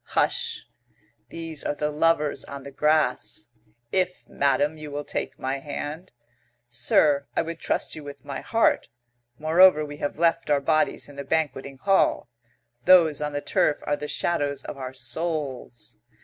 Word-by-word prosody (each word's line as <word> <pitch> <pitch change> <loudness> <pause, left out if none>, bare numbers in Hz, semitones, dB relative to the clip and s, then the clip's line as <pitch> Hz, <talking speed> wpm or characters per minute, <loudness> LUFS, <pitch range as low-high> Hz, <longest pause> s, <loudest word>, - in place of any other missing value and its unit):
Hush! - - +1 0.6
These 165 -3 -4
are - - -1
the 150 +1 -1
lovers 150 -1 +1
on 140 -1 -8
the 140 - -9
grass. 130 -7 +1 0.4
"If, 185 -1 -1
madam, 140 +2 +1
you 150 -1 -7
will 145 0 -4
take - - -4
my 135 +1 -2
hand 150 +4 -6 0.3
" - - -39 0.2
"Sir, 140 +4 +2
I - - +2
would 165 0 -6
trust - - -1
you 155 - -8
with 140 -2 -10
my 135 -2 -5
heart. 225 0 +2 0.5
Moreover, 160 0 +5
we 145 0 -8
have 145 - -3
left 165 0 +2
our 145 -1 +4
bodies 155 +3 +1
in 145 - -14
the 140 - -4
banqueting 140 -2 -2
hall. 195 -6 +2 0.5
Those 165 -5 +6
on 150 0 -2
the 145 - -2
turf 145 0 +1
are 145 - 0
the 150 - -6
shadows 145 -4 -1
of - - -6
our 130 -1 -7
souls." 130 -5 -4
145 Hz, 165 wpm, -25 LUFS, 140-160 Hz, 0.6 s, Those